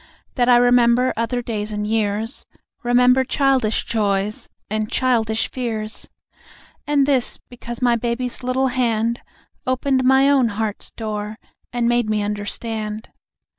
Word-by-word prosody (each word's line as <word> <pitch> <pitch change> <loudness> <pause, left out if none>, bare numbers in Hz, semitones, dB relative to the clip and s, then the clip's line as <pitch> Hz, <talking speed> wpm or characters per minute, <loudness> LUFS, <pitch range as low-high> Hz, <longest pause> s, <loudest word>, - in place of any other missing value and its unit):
That 245 -1 +2
I 245 - +7
remember 245 +1 +4
other 230 +2 -1
days 215 -2 -3
and 210 0 -2
years; 220 +2 -1 0.3
Remember 250 +1 +4
childish 260 -4 +1
joys 205 -2 -1 0.2
and 215 0 -2
childish 225 -4 +1
fears. 220 -4 -4 0.8
And 290 -2 +3
this, 270 -3 +1
because 240 0 -6
my 240 -1 +4
baby's 240 +2 -2
little 255 +1 +1
hand 235 -2 0 0.5
Opened 260 +1 +1
my 265 +1 +5
own 275 -4 +4
heart's 215 -1 -3
door 215 -1 -5 0.3
and 240 -1 0
made 240 -2 +2
me 210 -1 +1
understand. 210 +1 -4
235 Hz, 130 wpm, -21 LUFS, 215-250 Hz, 0.8 s, I